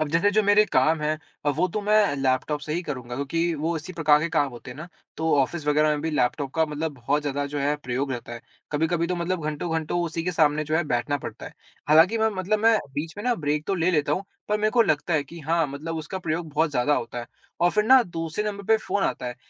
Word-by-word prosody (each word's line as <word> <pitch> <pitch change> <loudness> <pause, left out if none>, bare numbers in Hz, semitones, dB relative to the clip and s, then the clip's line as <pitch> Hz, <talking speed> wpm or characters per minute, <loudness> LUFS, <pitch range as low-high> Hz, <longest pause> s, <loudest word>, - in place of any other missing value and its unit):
अब 155 - 0
जैसे 165 +6 +2
जो 215 +1 +3
मेरे 205 +1 +5
काम 155 +5 +3
हैं 155 0 -1 0.4
वो 180 - +2
तो 210 +5 -3
मैं 210 -6 +3
लैपटॉप 135 +2 0
से 150 +1 -5
ही 175 - -1
करूँगा 125 -6 -6
क्योंकि 165 +6 -1
वो 160 +3 -1
इसी 160 +4 -7
प्रकार 150 -3 +4
के 170 - -1
काम 150 -4 +1
होते 120 0 -10
हैं 125 - -9
ना, 170 - -8 0.3
तो 160 +1 +1
ऑफ़िस 150 +3 -2
वग़ैरह 150 +1 +3
में 150 -1 +1
भी 160 +2 -2
लैपटॉप 135 0 0
का 160 -1 +2
मतलब 150 +1 -3
बहुत 140 +4 -1
ज़्यादा 145 0 -2
जो - - -1
है 145 +1 +1
प्रयोग 135 -1 -3
रहता 120 -1 -6
है। 120 - -7 0.3
कभी-कभी 165 +3 +1
तो 180 - -2
मतलब 170 -1 -2
घंटो-घंटों 160 +2 -2
उसी 165 0 -3
के 180 - -1
सामने 155 -2 +2
जो 155 +1 0
है 170 - +2
बैठना 125 +1 0
पड़ता - - -8
है। - - -10 0.4
हालाँकि 165 +9 +5
मैं 220 0 +3
मतलब 190 +3 0
मैं 225 +1 +4 0.2
बीच 155 +3 -4
में 205 - -6
ना 245 -1 +2
ब्रेक 150 -4 -2
तो 195 - 0
ले 175 0 +1
लेता 150 -4 +1
हूँ 185 +6 -1 0.2
पर 210 0 +1
मेरे 215 0 +2
को 235 +1 +5
लगता 160 -3 0
है 150 - +2
कि 170 +5 -11
हाँ 165 +1 +1
मतलब 150 +4 -5
उसका 160 +4 -5
प्रयोग 165 -1 -3
बहुत 155 +2 +1
ज़्यादा 140 +2 +2
होता 120 -1 -4
है 120 - -6 0.3
और 175 +1 +4
फिर 210 +2 +1
ना 260 +3 +7
दूसरे 165 +1 -4
नंबर 200 -1 -4
पे 220 +3 +4
फ़ोन 200 -2 -2
आता - - -2
है। 125 - -4
160 Hz, 260 wpm, -25 LUFS, 145-175 Hz, 0.4 s, ना